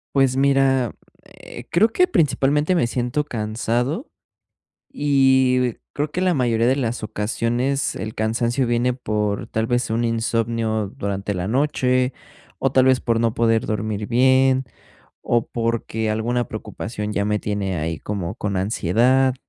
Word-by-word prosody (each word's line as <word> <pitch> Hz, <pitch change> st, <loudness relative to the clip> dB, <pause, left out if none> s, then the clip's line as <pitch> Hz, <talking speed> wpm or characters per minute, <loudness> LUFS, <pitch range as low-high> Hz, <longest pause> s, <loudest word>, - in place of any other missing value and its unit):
Pues, 135 Hz, -1 st, +3 dB
mira, 135 Hz, -3 st, +2 dB, 0.3 s
eh, -, -, -12 dB
creo 215 Hz, +7 st, +4 dB
que, 365 Hz, +10 st, +3 dB
principalmente, 150 Hz, -, +2 dB
me 165 Hz, -9 st, +2 dB
siento 125 Hz, +4 st, -1 dB
cansado, 120 Hz, -, -2 dB, 0.8 s
y 130 Hz, -3 st, +2 dB, 0.2 s
creo 150 Hz, +1 st, -3 dB
que 180 Hz, -, -2 dB
la 185 Hz, -1 st, +2 dB
mayoría 120 Hz, -4 st, +1 dB
de 130 Hz, -, +2 dB
las 120 Hz, -4 st, -2 dB
ocasiones 120 Hz, +6 st, -1 dB
el 110 Hz, 0 st, -5 dB
cansancio 120 Hz, +4 st, 0 dB
viene 120 Hz, +1 st, +1 dB
por, 105 Hz, -3 st, -2 dB
tal 110 Hz, 0 st, -1 dB
vez, 120 Hz, -1 st, 0 dB
un 115 Hz, +1 st, 0 dB
insomnio 115 Hz, -2 st, -1 dB
durante 100 Hz, 0 st, -3 dB
la 90 Hz, +2 st, -3 dB
noche 130 Hz, -1 st, +1 dB, 0.5 s
o, 135 Hz, -, +2 dB
tal 130 Hz, -1 st, +4 dB
vez, 130 Hz, -1 st, +4 dB
por 115 Hz, -1 st, 0 dB
no 115 Hz, -1 st, +1 dB
poder 115 Hz, +1 st, +2 dB
dormir 105 Hz, -1 st, -2 dB
bien, 130 Hz, +2 st, +3 dB, 0.6 s
o 120 Hz, -1 st, +1 dB
porque 115 Hz, -1 st, -2 dB
alguna 120 Hz, +2 st, -1 dB
preocupación 105 Hz, -1 st, -5 dB
ya 100 Hz, -, 0 dB
me 105 Hz, 0 st, 0 dB
tiene 100 Hz, -3 st, -2 dB
ahí 80 Hz, 0 st, -3 dB
como 100 Hz, -2 st, -4 dB
con 100 Hz, -3 st, -3 dB
ansiedad, 120 Hz, +7 st, +2 dB
120 Hz, 145 wpm, -21 LUFS, 110-130 Hz, 0.8 s, creo